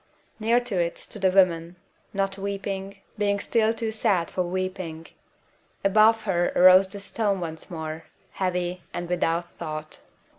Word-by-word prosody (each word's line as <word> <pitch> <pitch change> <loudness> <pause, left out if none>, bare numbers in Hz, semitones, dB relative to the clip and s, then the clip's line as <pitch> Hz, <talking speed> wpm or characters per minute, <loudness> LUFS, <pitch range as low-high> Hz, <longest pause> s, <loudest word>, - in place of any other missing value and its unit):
Near 230 +2 +3
to 215 -7 -2
it 170 0 -1
stood 210 - -8
a - - +6
woman, 175 -2 +3 0.4
not 195 -1 -1
weeping, 195 0 -4 0.2
being 200 -1 +1
still 220 +1 +2
too 225 -1 -3
sad 205 -6 +1
for 185 - -1
weeping. 180 -2 -3 0.8
Above 215 +2 +5
her 175 -4 +1
arose 185 +1 +7
the 200 +1 -6
stone 200 -1 -1
once 160 -2 -4
more, 160 -1 -6 0.3
heavy 180 -1 -2
and 175 - -3
without 170 -1 0
thought. 155 -2 -6
185 Hz, 145 wpm, -25 LUFS, 175-200 Hz, 0.8 s, arose